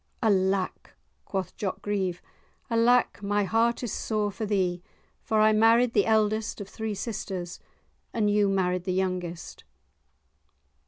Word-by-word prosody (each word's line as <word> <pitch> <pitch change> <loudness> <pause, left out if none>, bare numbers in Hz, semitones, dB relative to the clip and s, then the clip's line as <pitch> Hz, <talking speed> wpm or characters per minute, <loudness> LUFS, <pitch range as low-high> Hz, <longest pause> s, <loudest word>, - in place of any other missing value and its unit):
"Alack!" 190 -3 0 0.3
quoth 190 -3 -4
Jock 195 -3 -4
Grieve, 190 -4 -2 0.5
"alack, 235 0 +3
my 205 0 +1
heart 230 +4 +1
is 235 - -3
sore 210 -2 -1
for 215 +2 -4
thee! 185 -4 0 0.4
for 220 -2 0
I 215 0 +5
married 230 +2 +4
the 205 - +3
eldest 215 0 +1
of 200 - -6
three 220 +1 -4
sisters, 190 -5 -5 0.5
and 220 -2 0
you 205 -1 +3
married 180 -2 0
the 185 - -1
youngest." 180 -2 -3
205 Hz, 130 wpm, -27 LUFS, 190-220 Hz, 0.5 s, I